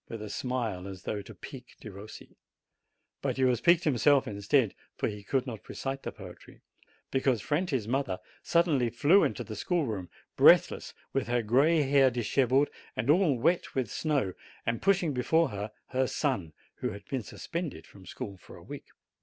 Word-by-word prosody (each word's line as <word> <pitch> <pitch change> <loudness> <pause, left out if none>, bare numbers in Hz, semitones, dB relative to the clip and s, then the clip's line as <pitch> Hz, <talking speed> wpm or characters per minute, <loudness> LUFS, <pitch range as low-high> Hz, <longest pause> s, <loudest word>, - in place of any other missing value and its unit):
with 115 - -6
a 105 -1 -6
smile, 115 -8 -2
as 95 -2 -9
though 105 - -3
to 105 +2 -12
pique 125 +7 -11
Derossi. 105 0 -11 0.9
But - - -1
he 130 - +2
was 125 -2 +3
piqued 170 +2 +5
himself, 140 0 +3
instead, 105 +3 +1 0.2
for - - -1
he 105 -1 -5
could 130 +5 0
not 115 -6 -8
recite 135 0 -4
the - - -5
poetry, - - -13 0.5
because 130 -3 +2
Franti's 145 - -1
mother 125 -6 -1 0.2
suddenly 155 -8 +2
flew 145 - +4
into - - -1
the - - -7
schoolroom, 115 - -1 0.3
breathless, - - +5 0.2
with - - 0
her 120 -1 +1
gray 145 +8 +4
hair 135 -1 +5
dishevelled 130 +3 +2 0.3
and 115 +7 +2
all 160 -5 +3
wet 170 +9 +1
with 130 -6 -1
snow, 140 - 0 0.3
and 115 0 -1
pushing 190 -6 +2
before 160 +6 +2
her 105 +1 -5 0.2
her 130 0 +1
son, 110 - -1 0.2
who 125 - -2
had 100 -2 -9
been 130 +2 -3
sus 105 - -10
pended 165 - -4
from 95 -3 -16
school 100 +2 -7
for - - -14
a - - -14
week. - - -9
125 Hz, 175 wpm, -29 LUFS, 105-145 Hz, 0.9 s, piqued